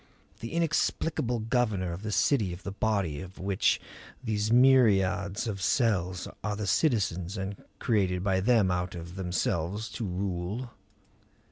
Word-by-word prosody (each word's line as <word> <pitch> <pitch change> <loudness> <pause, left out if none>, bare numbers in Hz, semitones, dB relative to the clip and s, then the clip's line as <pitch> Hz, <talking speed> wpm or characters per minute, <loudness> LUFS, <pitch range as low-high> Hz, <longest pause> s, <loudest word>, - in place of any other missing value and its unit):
The 115 - -6
inexplicable 160 -5 0
governor 110 -6 0
of 85 - -7
the 110 0 -4
city 105 -4 +2
of 90 - -10
the 100 - -4
body 100 -8 -1
of 95 +1 -10
which 95 0 +1 0.4
these 110 -2 -1
myriads 105 -6 +4
of 100 -4 -4
cells 95 -8 +1 0.2
are 105 0 -1
the 105 0 -3
citizens 100 - +1
and 95 +1 -5
created 95 -5 +1
by 95 -1 +2
them 105 -2 +3
out 90 0 -2
of 85 0 -8
themselves 90 +2 -2
to 115 - -5
rule? 95 +6 -3
100 Hz, 140 wpm, -29 LUFS, 90-115 Hz, 0.4 s, myriads